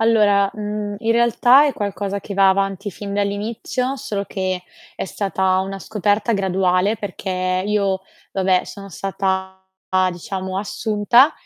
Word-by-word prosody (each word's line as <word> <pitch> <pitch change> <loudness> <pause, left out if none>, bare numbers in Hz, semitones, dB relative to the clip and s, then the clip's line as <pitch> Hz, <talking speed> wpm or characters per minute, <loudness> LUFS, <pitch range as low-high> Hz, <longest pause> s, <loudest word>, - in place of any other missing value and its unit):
Allora, 205 -3 +4
mhmm, 210 -1 -4
in 225 +2 -1
realtà 235 +4 +5
è 290 - +1
qualcosa 200 -1 -3
che 200 - -7
va 195 0 +6
avanti 195 +1 -1
fin 200 +1 -6
dall'inizio, 215 +6 -2
solo 200 -6 -3
che 185 -1 -2 0.3
è - - -4
stata 190 -1 0
una 195 +1 -4
scoperta 210 +2 0
graduale 190 +1 +1
perché 185 -2 -2
io, 200 -2 +1 0.3
vabbè, 185 -1 +2
sono 200 -1 -9
stata, 190 0 -2 0.5
diciamo, 185 +2 -4
assunta 215 +6 +3
200 Hz, 130 wpm, -20 LUFS, 190-210 Hz, 0.5 s, va